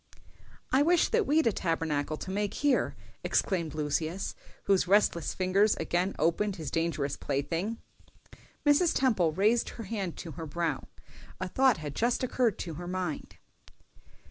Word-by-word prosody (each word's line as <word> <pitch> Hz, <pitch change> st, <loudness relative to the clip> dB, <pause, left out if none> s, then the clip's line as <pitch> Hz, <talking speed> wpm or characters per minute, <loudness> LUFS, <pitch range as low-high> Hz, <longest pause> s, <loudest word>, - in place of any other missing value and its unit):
] -, -, -23 dB, 0.3 s
"I 265 Hz, -, +4 dB
wish 340 Hz, +3 st, +4 dB
that 460 Hz, -2 st, +1 dB
we'd 315 Hz, +3 st, +3 dB
a 230 Hz, -, +4 dB
Tabernacle 160 Hz, -5 st, -1 dB
to 190 Hz, -, -6 dB
make 205 Hz, +1 st, -1 dB
here," 285 Hz, -2 st, +1 dB, 0.3 s
exclaimed 170 Hz, -6 st, 0 dB
Lucius, 155 Hz, +5 st, -2 dB, 0.3 s
whose 195 Hz, -2 st, +2 dB
restless 190 Hz, -4 st, +2 dB
fingers 195 Hz, +3 st, +3 dB
again 180 Hz, +3 st, -1 dB
opened 185 Hz, +6 st, +1 dB
his 155 Hz, -6 st, -6 dB
dangerous 165 Hz, -4 st, -1 dB
plaything. 165 Hz, +11 st, -2 dB, 0.9 s
Mrs. 290 Hz, +4 st, +4 dB
Temple 220 Hz, -, +2 dB
raised 210 Hz, +8 st, +2 dB
her 230 Hz, -, -5 dB
hand 195 Hz, -4 st, -4 dB
to 165 Hz, -, -7 dB
her 160 Hz, +2 st, -7 dB
brow: 160 Hz, -2 st, -2 dB, 0.5 s
a 185 Hz, -, -2 dB
thought 260 Hz, +5 st, +3 dB
had 150 Hz, -3 st, -6 dB
just 240 Hz, -, 0 dB
occurred 245 Hz, -4 st, +1 dB
to 170 Hz, -, -5 dB
her 175 Hz, -, -6 dB
mind. 180 Hz, -4 st, -4 dB
185 Hz, 150 wpm, -29 LUFS, 165-225 Hz, 0.9 s, I